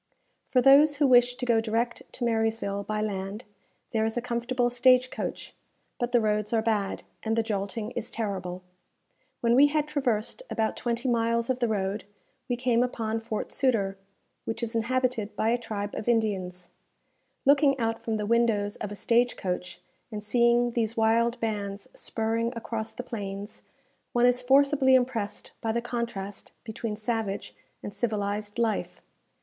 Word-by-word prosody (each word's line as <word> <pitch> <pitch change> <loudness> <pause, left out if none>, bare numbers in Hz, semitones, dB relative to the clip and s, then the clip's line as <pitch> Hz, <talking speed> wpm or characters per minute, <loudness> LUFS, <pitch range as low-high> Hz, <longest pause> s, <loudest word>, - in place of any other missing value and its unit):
For 250 -2 +3
those 290 +2 +7
who 285 0 +2
wish 245 -1 +5
to 250 - -4
go 230 -2 +3
direct 230 +2 -1
to 250 - -5
Marysville 225 -3 0
by 215 +1 -2
land, 200 +1 -3 0.5
there 220 -1 +1
is 220 +1 -1
a - - +3
comfortable 245 +1 0
stage 255 +1 +4
coach; - - -5 0.5
but 240 0 -1
the 245 - +5
roads 210 -1 0
are 225 - +3
bad, 210 -3 -1 0.2
and 225 0 -1
the 230 - +2
jolting 210 +1 -3
is 240 -2 -4
terrible. 185 -5 -4 0.8
When 235 0 +3
we 275 +4 +7
had 300 0 0
traversed 260 - -1
about 220 -1 0
twenty 240 +2 -2
miles 235 0 +1
of 255 - -2
the 240 - +2
road, 200 -1 -2 0.4
we 245 - +1
came 240 -1 +2
upon 225 -3 -1
Fort 225 -1 -4
Sutter, 220 -8 +1 0.5
which 225 +1 -4
is 230 0 -3
inhabited 230 -2 0
by 220 +2 +1
a 240 - +3
tribe 210 -3 -4
of 220 - -3
Indians. 190 -6 -1 0.7
Looking 280 0 +5
out 225 -2 -1
from 225 -1 -1
the 210 - -2
windows 220 -2 +2
of 210 - -5
a - - -5
stage 240 +4 +2
coach, 180 -1 -4 0.3
and 210 -1 -5
seeing 240 +2 +3
these 230 -1 -1
wild 230 +2 +2
bands 205 -3 -3
spurring 225 +1 -1
across 225 -1 -4
the 250 - -7
plains, 205 -3 -6 0.5
one 240 0 +4
is 245 0 +4
forcibly 270 +1 +5
impressed 245 -5 -1
by 225 - 0
the 235 - 0
contrast 235 -5 -5
between 220 -1 -4
savage 215 -2 -3 0.3
and 205 - -6
civilized 205 -1 -2
life. 230 -2 -1
225 Hz, 165 wpm, -27 LUFS, 210-245 Hz, 0.8 s, those